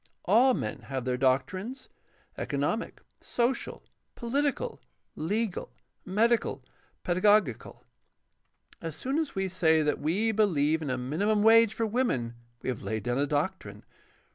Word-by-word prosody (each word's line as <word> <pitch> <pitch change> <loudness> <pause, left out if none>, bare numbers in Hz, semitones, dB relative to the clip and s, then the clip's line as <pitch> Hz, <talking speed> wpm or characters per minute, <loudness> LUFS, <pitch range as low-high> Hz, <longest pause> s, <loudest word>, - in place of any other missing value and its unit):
All 240 +7 +5
men 110 - -4
have 130 -2 -4
their 125 -1 0
doctrines 160 - -1 0.3
— - - -36
^economic, - - -1 0.3
social, 245 +2 -2 0.3
political, 285 - -1 0.3
legal, 205 +4 -2 0.3
medical, 225 +5 +1 0.4
pedagogical. 185 - +2 1.0
As 165 -2 -5
soon 270 - -1
as 315 -3 -3
we 195 0 0
say 160 -4 +3
that 150 -1 0
we 190 +10 +1
believe 160 -8 +2
in 150 - -3
a 130 - -1
minimum 200 +12 0
wage 225 0 +6
for 225 - 0
women 210 - 0 0.3
we - - -2
have 125 - -3
laid 105 +1 -3
down 120 +3 -1
a 145 - +1
doctrine. 155 +7 -3
190 Hz, 135 wpm, -28 LUFS, 145-225 Hz, 1.0 s, wage